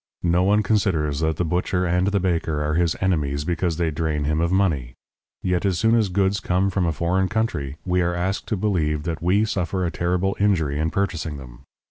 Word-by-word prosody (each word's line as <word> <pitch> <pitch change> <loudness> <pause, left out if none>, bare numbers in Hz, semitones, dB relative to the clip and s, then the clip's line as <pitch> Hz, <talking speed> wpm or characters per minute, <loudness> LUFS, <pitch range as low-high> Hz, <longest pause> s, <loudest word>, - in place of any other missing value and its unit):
No 85 +1 +3
one 105 +3 +3
considers 90 -9 +1
that 80 0 0
the 90 - 0
butcher 90 +2 0
and 90 +2 +1
the 100 0 +1
baker 80 -4 -1
are 75 +1 -1
his 85 0 +1
enemies 75 -7 0
because 85 -1 -1
they 85 -2 0
drain 75 -1 -1
him 75 +2 0
of 85 +1 +1
money. 80 -11 0 0.5
Yet 90 -1 0
as 95 -4 +1
soon 110 +5 +3
as 110 -4 +3
goods 95 +2 +1
come 95 +1 0
from 90 -2 0
a - - +1
foreign 90 +4 0
country, 80 -11 -2
we 90 0 +1
are 85 0 0
asked 95 +3 -2
to 110 - -1
believe 80 -7 0
that 80 0 -4
we 95 +5 +2
suffer 95 -3 -1
a 85 - -1
terrible 90 +3 0
injury 80 -9 +1
in 80 +1 +1
purchasing 85 -4 -2
them. - - -12
90 Hz, 210 wpm, -23 LUFS, 80-95 Hz, 0.5 s, No